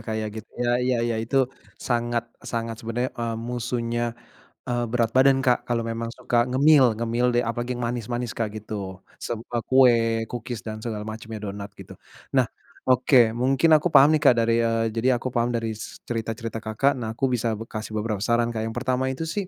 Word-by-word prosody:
kayak 110 -1 -2
gitu - - -34
ya 120 - +2
ya 125 -1 +1
ya 120 -1 0
itu 130 +3 +1 0.3
sangat-sangat 120 -1 -2
sebenarnya, 120 +2 -2
eee, 115 -1 -2
musuhnya, 120 0 -2 0.5
eee, 120 -1 0
berat 115 -2 +1
badan 135 0 +5
Kak 125 -1 +3
kalau 120 -1 +1
memang 115 0 -3
suka 120 0 +1
ngemil 135 -1 +5
ngemil 115 +2 0
deh - - 0
apalagi 120 +2 -2
yang 120 - -4
manis-manis 120 0 -3
Kak 110 -3 -2
gitu 100 -3 -6 0.2
semua 120 +1 -4
kue, 115 -3 +4
kukis 120 0 -5
dan 110 0 -6
segala 105 -3 -4
macamnya 110 0 -6
donat 100 0 -6
gitu. - - -10 0.4
Nah, - - +6 0.5
oke, 125 -2 +5
mungkin 130 +6 +2
aku 175 - 0
paham 140 +3 +8
nih - - -9
Kak 130 - +8
dari, 115 0 +2
eee, 115 0 +1
jadi 120 +3 +2
aku 130 +1 -4
paham 120 0 +1
dari 115 -1 -1
s 110 - -9
cerita-cerita 115 -1 -4
Kakak 110 +6 +1
nah 110 -1 -4
aku 135 0 0
bisa 115 -2 0
b 110 - -6
kasih 110 0 -6
beberapa 105 -1 -2
saran 115 +3 +1
Kak 110 - -4
yang 110 - -6
pertama 130 +1 0
itu 130 +5 -3
sih, 185 +4 -3
115 Hz, 190 wpm, -24 LUFS, 115-125 Hz, 0.5 s, paham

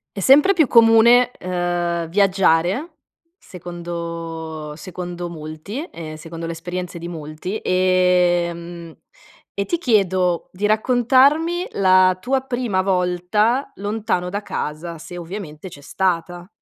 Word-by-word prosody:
È - - -5
sempre 285 - +6
più 320 -7 +3
comune, 235 +2 +6
uhm, 175 -1 -2
viaggiare, 195 - +1 0.4
secondo 170 - -7
secondo 175 +1 -6
molti, 160 - -7
ehm 160 -2 -8
secondo 165 +1 -8
le 165 - -3
esperienze 175 +1 -6
di 170 - -7
molti, 160 +4 -6
ehm 175 -2 +1 0.6
e 200 - -1
ti 345 - -1
chiedo 185 - +1
di 200 +3 -1
raccontarmi 265 - +3
la 185 -1 +4
tua 265 +5 0
prima 245 -7 -1
volta 190 +7 0
lontano 205 -3 -2
da 205 +2 -4
casa, 165 -1 -5
se 175 +3 -9
ovviamente 175 -1 -8
c'è 145 - -13
stata. 175 +2 -2
180 Hz, 115 wpm, -20 LUFS, 170-210 Hz, 0.6 s, sempre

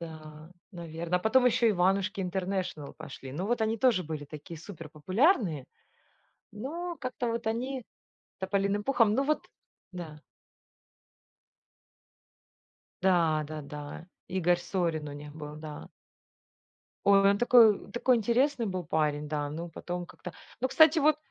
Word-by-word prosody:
Да, 155 -1 -10 0.2
наверно, 170 0 -3
а - - +1
потом 250 +5 +4
ещё 240 -1 +4
"Иванушки 195 +2 +1
International" 185 -5 -3
пошли. 130 0 -9
Ну 175 +7 -3
вот 240 +1 0
они 220 +1 +1
тоже 235 -6 +3
были 155 -2 -5
такие 155 +3 -9
супер 165 -2 -9
популярные. 185 - +1 0.9
Но 335 - -5
как-то 255 -1 -3
вот 230 0 -3
они 250 +4 -2 0.6
"Тополиным 200 +2 0
пухом"? 230 -5 +3
Ну 275 - +2
вот 305 +2 0 0.5
да. 160 -4 -8 2.8
Да, 170 -5 +3
да-да. 150 +1 -7 0.2
Игорь 180 -1 +2
Сорин 170 -4 -2
у 145 - -7
них 145 0 -9
был, 150 -1 -8
да. 155 -1 -8 1.2
Ой, 200 0 +6
он 200 - +1
такой 240 -2 +7
он - - -15
такой 245 +1 +3
интересный 240 +3 +1
был 185 -3 -3
парень, 150 -1 0
да, 145 -1 -2
ну, 165 +3 -5
потом 175 +1 -5
как-то 180 - -10 0.3
Ну, 260 - +1
кстати 315 +3 +6
вот 305 0 +4
185 Hz, 135 wpm, -29 LUFS, 155-230 Hz, 2.8 s, такой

